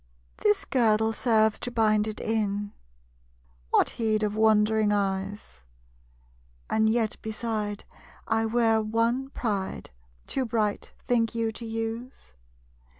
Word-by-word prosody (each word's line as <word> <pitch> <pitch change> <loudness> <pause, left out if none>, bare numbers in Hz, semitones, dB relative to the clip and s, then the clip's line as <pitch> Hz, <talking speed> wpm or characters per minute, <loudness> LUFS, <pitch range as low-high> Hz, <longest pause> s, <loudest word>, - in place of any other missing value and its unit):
This 210 - +2
girdle 220 -3 +2
serves 220 -3 +2
to - - -3
bind 215 -3 +2
it 215 - -5
in; 205 -2 -1 1.0
What - - +3
heed 215 -1 +1
of 210 0 -1
wondering 215 -1 +3
eyes? 195 - -2 1.1
And 220 0 +3
yet 220 -1 0
beside, 215 -2 -3 0.4
I 225 0 +1
wear 225 -1 +2
one 230 +5 0
pride 205 -8 -3 0.3
Too 265 - -1
bright, 215 -3 -1
think 230 -1 +1
you, 225 -1 0
to 230 +2 -8
use? 225 - -5
220 Hz, 115 wpm, -27 LUFS, 210-230 Hz, 1.1 s, What